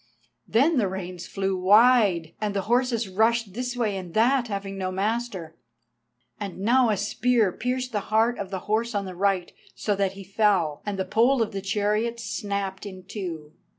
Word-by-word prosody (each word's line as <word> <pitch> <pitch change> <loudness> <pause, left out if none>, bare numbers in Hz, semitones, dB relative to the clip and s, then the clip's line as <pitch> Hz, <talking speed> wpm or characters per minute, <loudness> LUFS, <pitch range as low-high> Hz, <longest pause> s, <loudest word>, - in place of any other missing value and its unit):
Then 280 +8 +3
the 215 -5 +2
reins 185 -2 -6
flew 195 -1 -1
wide, 195 -4 +4
and 210 -1 -1
the 195 - +1
horses 240 -1 +1
rushed 220 +1 +1
this 245 +2 -4
way 215 -5 0
and 180 -3 -7
that, 245 +3 +3
having 195 -2 -4
no 185 -1 -3
master. 195 -4 -2 0.8
And 200 -3 -5
now 235 +5 +3
a 210 - +1
spear 220 +1 +1
pierced 250 +4 -3
the 210 - 0
heart 225 +3 +2
of 195 -2 -4
the 190 -2 -4
horse 220 +1 0
on 200 -1 -1
the 185 - -6
right, 190 -1 0 0.2
so 205 - -1
that 195 -1 0
he 195 0 -9
fell, 195 -6 +1
and 205 -1 -2
the 190 - -1
pole 235 +5 +3
of 220 - -5
the 195 - -4
chariot 210 +4 0
snapped 200 -3 -4
in 185 -2 -9
two. 170 -6 -6
205 Hz, 185 wpm, -25 LUFS, 190-230 Hz, 0.8 s, wide